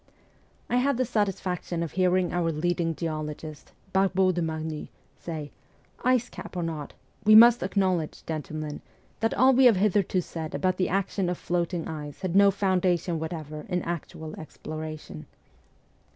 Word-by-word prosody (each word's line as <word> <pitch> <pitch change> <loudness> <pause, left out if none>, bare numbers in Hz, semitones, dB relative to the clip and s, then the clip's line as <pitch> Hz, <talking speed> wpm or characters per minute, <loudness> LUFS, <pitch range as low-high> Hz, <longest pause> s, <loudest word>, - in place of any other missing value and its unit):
I 245 - +1
had 265 +1 +2
the 255 - +1
satisfaction 185 -5 -1
of 165 - -4
hearing 185 -1 +2
our 170 -2 +1
leading 165 +1 0
geologist, 155 -2 -5 0.2
Barbot 190 -1 +3
de 175 - -1
Marny, 160 -1 -4 0.3
say, 155 -4 -6 0.3
' - - -27
Ice 250 -1 +1
cap 185 - -9
or 175 - -1
not, 160 -3 -4 0.3
we 215 +1 +7
must 235 +2 +9
acknowledge, 185 -4 0
gentlemen, 155 -1 -5 0.4
that 225 - 0
all 260 +2 +5
we 260 +1 +5
have 240 -4 +7
hitherto 195 -1 +2
said 160 -2 -5
about 185 -1 0
the 185 - +1
action 195 -1 0
of 180 - -2
floating 175 -1 -2
ice 150 -1 -7
had 185 -2 -2
no 200 0 +7
foundation 185 -3 +1
whatever 155 -2 -5
in 180 -2 -1
actual 160 -2 -5
exploration.' 155 - -7
175 Hz, 150 wpm, -27 LUFS, 160-190 Hz, 0.4 s, must